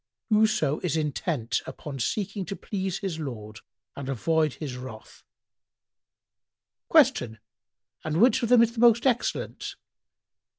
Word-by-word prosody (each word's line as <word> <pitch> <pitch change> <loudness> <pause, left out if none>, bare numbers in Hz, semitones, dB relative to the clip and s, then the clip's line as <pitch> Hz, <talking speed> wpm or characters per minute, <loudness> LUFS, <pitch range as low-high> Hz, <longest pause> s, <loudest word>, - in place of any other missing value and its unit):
"—"Whoso 210 -9 +3
is 165 -3 -1
intent 145 -5 -1
upon 140 -3 -7
seeking 200 - -2
to 200 - -5
please 190 -2 -3
his 185 -5 -4
Lord 110 -7 -7 0.4
and 140 -1 -6
avoid 155 +3 +1
His 140 -5 -6
wrath." 125 -3 -10 1.7
Q 115 -2 +4 0.7
"And 155 +1 -1
which 255 +4 +5
of 235 - -1
them 245 -2 +7
is 235 0 0
the 230 - -6
most 235 0 +5
excellent?" 250 -3 -1
160 Hz, 125 wpm, -26 LUFS, 135-215 Hz, 1.7 s, them